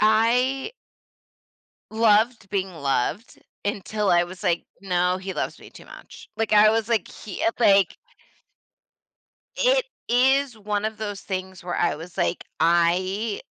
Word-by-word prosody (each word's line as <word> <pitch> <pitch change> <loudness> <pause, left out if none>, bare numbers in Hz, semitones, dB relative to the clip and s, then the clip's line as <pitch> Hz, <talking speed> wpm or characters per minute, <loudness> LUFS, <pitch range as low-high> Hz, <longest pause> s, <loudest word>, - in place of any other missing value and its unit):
I 245 - +2 1.2
loved 220 -1 +2
being 190 -2 -2
loved 140 - -2 0.3
until 205 +1 -1
I 175 0 +4
was 180 +1 -10
like, 170 -1 +1 0.2
"No, 180 -1 +1
he 190 0 -6
loves - - -4
me - - -13
too - - -14
much." - - -13
Like, 225 -1 0
I 210 +1 +7
was 225 0 0
like 225 -6 0
he, 205 - -7
uh, 225 - +3
like 200 -5 +4 1.6
it - - +3 0.2
is 265 +1 +2
one 210 0 -2
of 220 0 -4
those 205 -2 -5
things 190 -1 -6
where 175 - -3
I 175 - +1
was 165 +4 -11
like, 175 -1 -1
I 185 +6 +1
205 Hz, 140 wpm, -24 LUFS, 180-225 Hz, 1.6 s, I